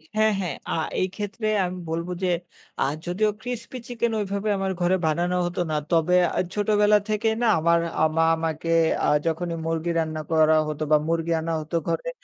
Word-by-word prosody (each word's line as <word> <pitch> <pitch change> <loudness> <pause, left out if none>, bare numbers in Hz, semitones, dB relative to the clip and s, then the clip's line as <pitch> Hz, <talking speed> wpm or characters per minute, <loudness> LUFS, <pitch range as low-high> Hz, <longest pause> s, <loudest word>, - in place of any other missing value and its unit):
হ্যাঁ, 215 0 +3
হ্যাঁ। 180 -3 -2
আ - - 0 0.3
এই 185 - +2
ক্ষেত্রে 215 +2 -4 0.2
আমি 180 +1 -4
বলব 165 +1 -2 0.2
যে, 180 - +2 0.5
আ - - +5 0.2
যদিও 190 +5 +1
crispy 245 +1 -5
chicken 235 -1 -1
ঐভাবে 200 +1 -2
আমার 195 0 -1
ঘরে 180 +2 +3
বানানো 175 +3 +1
হতো 175 +1 -2
না। - - 0 0.2
তবে 170 +1 +3 0.2
আ - - +2
ছোটবেলা 210 0 +3
থেকেই 220 +1 +1
না 240 - +3
আমার 170 +1 +3 0.2
আ - - +5
মা 165 - +5
আমাকে 160 0 -3 0.4
আ - - +2 0.2
যখনই 170 +1 -1
মুরগি 165 +1 -1
রান্না 155 -1 -2
করা 160 0 +5
হতো 155 0 -3
বা 155 - +7
মুরগি 165 0 0
আনা 165 +1 -2
হতো 155 +2 -2
ঘরে। - - -1
175 Hz, 185 wpm, -24 LUFS, 165-210 Hz, 0.5 s, বা